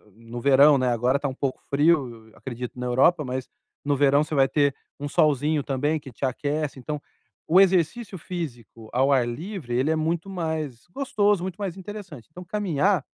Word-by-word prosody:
no 115 +1 -8
verão, 140 +2 +6
agora 125 +2 +2
está 140 - -2
um 130 - -4
pouco 135 -2 -2
frio, 135 -7 +1
acredito 125 -1 -7
na 125 - -3
Europa, 140 +5 +3
mas 130 0 -4 0.4
no 145 -1 +2
verão 145 +1 +4
você 155 -1 -4
vai 135 -1 +5
ter 140 -1 +2 0.2
um 145 - -4
solzinho 150 0 +2
também 145 +3 0
que 135 -3 -11
te 120 - -12
aquece. 145 +2 -2
Então, 150 +3 -5 0.5
o 180 +4 +5
exercício 190 +3 +1
físico 120 - -7
ao 135 +3 +3
ar 125 -3 +3
livre, 150 - -5
ele 135 +5 +1
é - - +2
muito 165 +4 -1
mais 160 -9 -4
gostoso, 205 -7 +1
muito 190 0 -5
mais 195 -4 -4
interessante. 190 - -9
Então 180 +3 -10
caminhar, 190 -4 +1
145 Hz, 180 wpm, -25 LUFS, 130-170 Hz, 0.5 s, verão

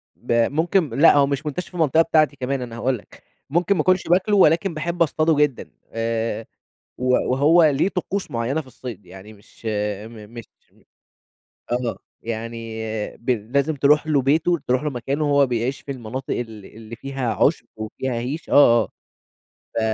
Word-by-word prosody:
ب - - -7 0.2
ممكن 165 +1 +1
لأ 145 +7 +5
هو 140 - +5
مش 140 +2 -3
منتشر 150 +5 -4
في - - -27
المنطقة 160 -1 +3
بتاعتي 155 -3 +2
كمان 130 0 -2
أنا 120 -2 -6
هاقول 130 +2 0
لك، 105 - -18 0.3
ممكن 175 +6 +2
ما - - +1
أكونش 185 -2 +2
باكله 190 +4 +3
ولكن 170 +1 +4
باحب 170 +2 -4
اصطاده 155 +1 +1
جدًا، 145 -4 0 0.2
آآ 115 0 -2 0.5
و 125 - -4 0.3
وهو 155 +6 +5
ليه 145 +4 +3
طقوس 195 +1 -3
معيّنة 120 +6 -1
في 150 - -11
الصيد، 120 -7 -9
يعني 95 +4 -12
مش 105 +2 -17 0.4
م 110 -2 -12
مش 115 - -7 1.3
آه، 120 -4 -1 0.3
يعني 115 0 -5 0.4
ب 120 - -8 0.2
لازم 140 +2 +2
تروح 145 +3 +3
له 145 -3 +3
بيته، 160 +6 +2
تروح 130 +3 +1
له 150 - 0
مكانه 140 +4 -2
هو 140 -1 +4
بيعيش 125 +2 -2
في 140 - -7
المناطق 130 +1 -5
اللي 110 -5 -7
اللي 115 +1 -9
فيها 130 -2 -3
عُشب، 135 - +2
وفيها 110 +4 -4
هِيش، 125 +7 -4
آه، 120 -5 +6
آه، - - -10 0.9
ف - - +1
135 Hz, 170 wpm, -22 LUFS, 115-155 Hz, 1.3 s, آه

